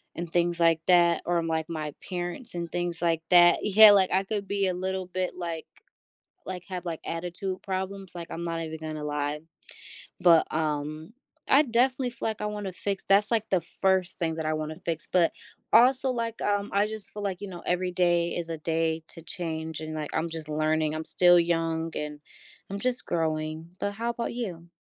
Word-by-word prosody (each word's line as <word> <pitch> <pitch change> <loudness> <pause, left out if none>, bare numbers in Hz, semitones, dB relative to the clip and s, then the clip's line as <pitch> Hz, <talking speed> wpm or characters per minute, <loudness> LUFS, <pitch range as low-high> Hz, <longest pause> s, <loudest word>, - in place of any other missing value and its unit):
and 170 0 -5
things 175 0 +1
like 165 -1 +5
that 175 -1 +5
or, 170 -1 +1
like, 160 -1 -1
my 155 -3 -4 0.2
parents 175 +5 -4
and 170 -1 -4
things 175 -1 -2
like 165 -2 +1
that 175 -1 +7
yeah, 210 +1 +9
like, 195 -2 +4
I 190 +1 +3
could 200 0 -3
be 200 -1 0
a 185 - 0
little 185 +1 -3
bit, 185 0 -3
like 170 -3 -5 0.8
like, 180 -1 -6
have, 180 -1 -5
like, 165 -2 -3
attitude 180 +3 -4
problems, 190 -1 -4
like, 170 -1 -6
I'm 170 - -4
not 165 -1 -2
even 160 -1 -5
gonna 155 -1 -5
lie. 145 0 -2 0.8
But, 170 -2 +6
um, 155 +3 -2 0.3
I 275 +3 +7
definitely 250 0 +1
feel 240 - -3
like 220 - -4
I - - 0
wanna 210 -2 -4
fix 200 0 -3
that's, 200 +2 +4
like, 225 -2 +1
the 185 -3 +2
1st 190 +2 0
thing 165 -2 -1
that 160 - -3
I 155 - +1
wanna 155 0 -4
fix, 165 -2 -4
but 175 -3 +3 0.4
also, 260 +2 +5
like, 230 -2 -3
um, 205 0 0
I 200 +1 +3
just 215 -1 -8
feel 210 - -6
like, 195 -3 -3
you 205 - -5
know, 175 -2 -8
every 180 +1 0
day 175 -1 +2
is 170 -1 -3
a 165 - -3
day 160 0 0
to 165 - -10
change, 160 -2 -4
and, 155 0 -5
like, 155 -1 -4
I'm 160 +1 0
just 160 -1 -5
learning. 155 0 +1
I'm 155 0 -4
still 175 +1 +5
young, 165 -1 0
and 150 0 -4 0.5
I'm 200 - -3
just 250 +1 -1
growing, 160 0 -2
but 200 - -1
how 230 +3 -2
'bout 235 0 -4
you? 180 -8 -5
175 Hz, 200 wpm, -27 LUFS, 160-195 Hz, 0.8 s, yeah